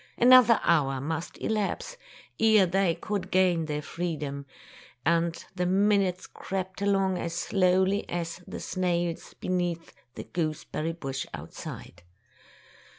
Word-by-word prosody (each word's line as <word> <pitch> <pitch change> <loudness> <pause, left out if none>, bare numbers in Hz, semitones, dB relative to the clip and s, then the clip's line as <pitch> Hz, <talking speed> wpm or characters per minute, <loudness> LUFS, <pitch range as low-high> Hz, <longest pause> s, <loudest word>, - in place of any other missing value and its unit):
An 250 +2 +6
other 240 -3 +8
hour 140 -5 +2
must 160 +4 -4
elapse 220 - -2 0.4
ere 220 -3 +6
they 180 -1 +1
could 200 -3 -4
gain 180 -4 +2
their 150 -1 -3
freedom, 145 -5 -4 0.6
and 170 +1 +1
the 180 -1 -1
minutes 195 -1 +2
crept 190 0 -5
along 195 -2 +1
as 170 0 -3
slowly 190 +2 +2
as 170 0 -4
the - - -6
snails 175 -2 -2
beneath 175 -2 -2 0.2
the - - -6
goose 155 -3 -3
berry 165 +2 -3
bush 135 -5 -5
outside. 85 - -9
180 Hz, 125 wpm, -28 LUFS, 165-195 Hz, 0.6 s, other